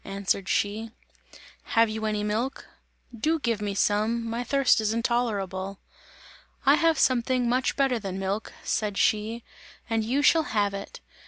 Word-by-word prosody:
answered 195 -1 -2
she. 215 +3 0 0.9
"Have 230 0 +6
you 220 0 -4
any 210 -1 -1
milk? 225 +6 -2 0.5
Do 310 +9 +1
give 235 -7 -1
me 205 -1 -2
some, 220 +4 +1
my 230 +2 -2
thirst 275 -2 +3
is 215 +1 0
intolerable!" 200 -5 -1 0.9
"I - - +7
have 330 -1 +3
something 250 0 +2 0.3
better 270 -4 +2
than 195 -3 -5
milk," 195 +3 -3
said 210 -3 -1
she, 220 +2 +1 0.4
"and 225 -1 0
you 260 +6 0
shall 325 +2 +5 0.2
have 205 -1 +2
it! 200 0 -7
220 Hz, 145 wpm, -26 LUFS, 205-240 Hz, 0.9 s, I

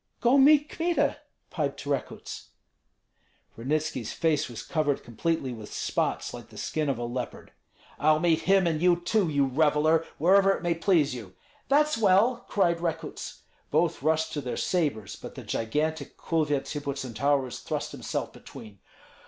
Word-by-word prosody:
"Go 245 +2 +4
meet 295 +2 +6
Kmita," 340 +2 0 0.3
piped 145 -3 -3
Rekuts. 140 -1 -4 1.1
Ranitski's 135 -1 -2
face 155 -5 +1
was 120 - -7
covered 150 -3 0
completely 130 +2 -2
with 110 -3 -9
spots, - - -2
like - - -9
the - - -14
skin 155 -2 -2
of 135 - 0
a 120 - -4
leopard. 120 +1 -5 0.5
"I'll 155 +1 +4
meet 165 -2 +3
him 195 -1 +5
and 160 -2 0
you 180 0 +5
too, 190 0 +1
you 145 -2 +2
reveller, 155 +3 +3
wherever 195 +5 +5
it - - -6
may 175 -1 +2
please 165 -4 +2
you!" 110 -7 -9 0.3
"That's 300 -1 +3
well!" 215 +4 +3
cried 170 -4 +2
Rekuts. 165 -2 -4 0.3
Both 115 - +1
rushed 160 +2 +1
to 145 - -2
their 125 -2 -4
sabres, 145 - -1
but - - -10
the - - -8
gigantic 150 +6 -2
Kulvyets 150 -4 -1
Hippocentaurus 140 -2 -1
thrust - - -3
himself - - -4
between. 105 -3 -12
155 Hz, 150 wpm, -27 LUFS, 135-175 Hz, 1.1 s, meet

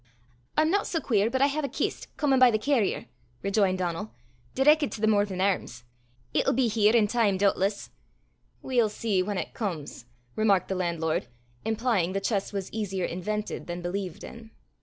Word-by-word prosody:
"I'm 310 +1 +3
no 405 +1 +3
sae 335 - -2
queer 220 -6 +1
but 260 +2 +1
I - - +6
hae 285 +2 -2
a 280 -3 -2
kist - - -3
comin' 275 -3 +3
by 255 -1 +8
the 220 - +2
carrier," 230 -2 0 0.4
rejoined 195 -2 +2
Donal, 180 +3 -3 0.4
"direckit 295 +2 +4
to - - -6
the - - +3
Morven 205 -3 +2
Airms. 185 -11 -1 0.5
It'll - - +2
be 255 0 +2
here 215 0 +3
in 225 -3 +5
time 205 -3 +1
doobtless." 200 +1 0 0.7
"We'll 240 -4 +2
see 210 -2 0
whan 200 +1 -2
it - - -4
comes," 165 - -5 0.3
remarked 200 -4 +2
the - - 0
landlord, 170 -3 -1 0.4
implying 220 -5 0
the 195 - 0
chest 195 0 -1
was 195 -2 -5
easier 195 -4 -2
invented 210 +5 -4
than 175 0 -5
believed 180 -1 -4
in. 230 -1 -10
210 Hz, 175 wpm, -27 LUFS, 185-235 Hz, 0.7 s, by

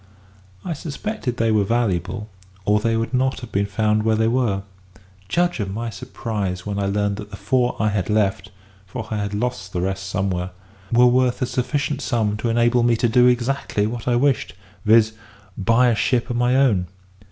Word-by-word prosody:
I 175 - -2
suspected 155 - -4
they 115 -2 +2
were 105 -2 +3
valuable, 105 -2 -1 0.4
or 105 +2 +3
they 115 +1 +1
would 115 +3 -2
not 130 +1 +1
have 120 -3 -9
been 100 +1 0
found 105 +1 +1
where 110 0 +2
they 110 +1 +2
were. 115 -5 +1 0.7
Judge 175 - +1
of 100 -2 -2
my 115 +3 -4
surprise 100 -2 -4
when 100 -1 -3
I 100 - 0
learned 100 0 0
that 105 -1 -8
the 100 - -9
four 125 +1 +1
I 110 - +2
had 100 -2 -2
left 105 -1 +1 0.4
(for 110 +2 -6
I 105 -1 -1
lost 105 -2 -3
the 90 - -1
rest 95 +1 -2
somewhere) 95 -2 -1 0.4
were 120 +1 +6
worth 125 0 +3
a - - +3
sufficient 140 +3 -2
sum 110 -6 0
to 115 - -2
enable 120 +1 +3
me 120 0 +3
to 120 - +1
do 125 +2 +5
exactly 125 -3 +1
what 115 +2 -5
I 120 - +3
wished; 135 -4 +1 0.3
viz., 110 0 +5 0.4
buy 115 +5 +3
a 115 - +2
ship 120 +3 0
of - - -2
my 120 +1 +2
own. 110 -10 +3
115 Hz, 190 wpm, -22 LUFS, 105-125 Hz, 0.7 s, were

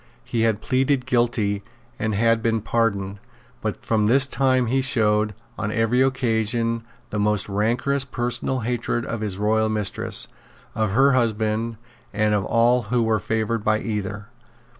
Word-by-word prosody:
He 115 - -1
had 110 -2 +1
pleaded 130 0 +1
guilty, 120 -5 +1 0.4
and 110 -2 -1
had 115 +2 +3
been 115 -1 +1
pardoned; 100 -3 -1 0.4
but 105 -4 -4
from 110 -2 +2
this 135 +4 +4
time 130 -2 +1
he 130 +3 +1
showed, 105 -5 +1 0.2
on 105 0 -2
every 115 +3 +2
occasion, 115 -3 +1 0.3
the 105 - -2
most 105 -1 +1
rancorous 120 +7 0
personal 125 0 -2
hatred 120 0 -1
of 115 -1 -4
his 100 -3 -2
royal 110 +1 +2
mistress, 105 -2 0 0.5
of 110 -3 -1
her 135 +4 +5
husband, 115 -2 0 0.4
and 105 0 +2
of 105 -1 +1
all 120 +2 +3
who 120 -1 +2
were 110 -1 +1
favoured 110 0 -1
by 110 0 +2
either. 105 0 -4
115 Hz, 150 wpm, -23 LUFS, 105-120 Hz, 0.5 s, her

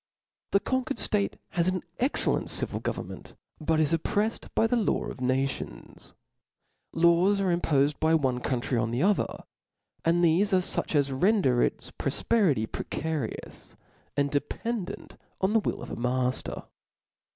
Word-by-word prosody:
The 200 - +3
conquered 260 +4 -1
ftate 205 -1 0
has 170 0 0
an 185 -1 0 0.2
excellent 260 +4 +2
civil - - -1
govcm - - -3
menty - - -11 0.2
but 155 0 +1
is 155 0 +2
opprefied 205 +7 -1
by - - +4
the 225 - +2
law 225 -5 +1
of - - -7
nations; 130 +2 -3 0.8
laws 170 +4 +4
are 190 -2 +1
impofed 145 -4 +1
by 160 +1 +3
one 130 -5 +1
country 125 -1 -1
on 110 0 0
the 120 +6 0
other, 205 +1 +1 0.6
and 170 +1 +3
thefe 190 +5 +3
are - - +6
fuch 180 -3 -1
as 140 -1 +2
render 135 - +3
its - - -1
prbfperity 160 - +1
precarious, 155 -7 -5 0.4
and 140 0 +1
dependent 205 +7 -3 0.2
on 190 +2 +1
the 225 - +5
will - - -3
of - - -8
a - - -3
mafter. 125 +1 -1
165 Hz, 150 wpm, -28 LUFS, 135-200 Hz, 0.8 s, are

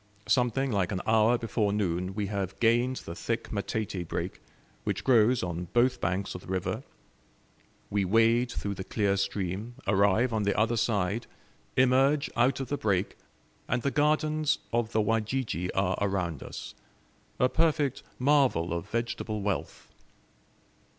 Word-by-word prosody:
Something 125 +4 +2
like 100 -3 0
an 95 -2 -2
hour 110 +2 +4
before 110 -3 0
noon 95 -2 -1
we 105 -1 -1
have 100 -2 -3
gained 120 +3 +3
the 85 - -7
thick 115 +6 -3
matete 100 -3 -3
brake, - - -4 0.4
which - - -2
grows 120 -2 +4
on 90 0 -3
both 120 +2 +3
banks 95 +2 -1
of 90 - -7
the - - -15
river; 95 -1 -2 1.1
we 100 0 +1
wade 115 +5 +3
through 100 - -3
the 95 - -6
clear 100 0 0
stream, 100 +3 -3
arrive 100 +5 +3
on 110 - +1
the 100 -1 0
other 110 +2 +2
side, 105 -1 0 0.5
emerge 135 +3 +3
out 125 +4 +2
of 135 -2 -4
the 145 - -1
brake, 100 -4 0 0.5
and 120 0 -1
the 140 - +1
gardens 155 +1 +2 0.2
of 115 -1 0
the 110 - +2
Wajiji 110 -4 -1
are 95 -1 +1
around 90 -6 -1
us - - -8 0.7
a 125 - +5
perfect 150 -2 +1 0.2
marvel 130 - +3
of 85 -1 -4
vegetable 115 -3 -2
wealth. 95 -8 -3
110 Hz, 150 wpm, -28 LUFS, 95-125 Hz, 1.1 s, a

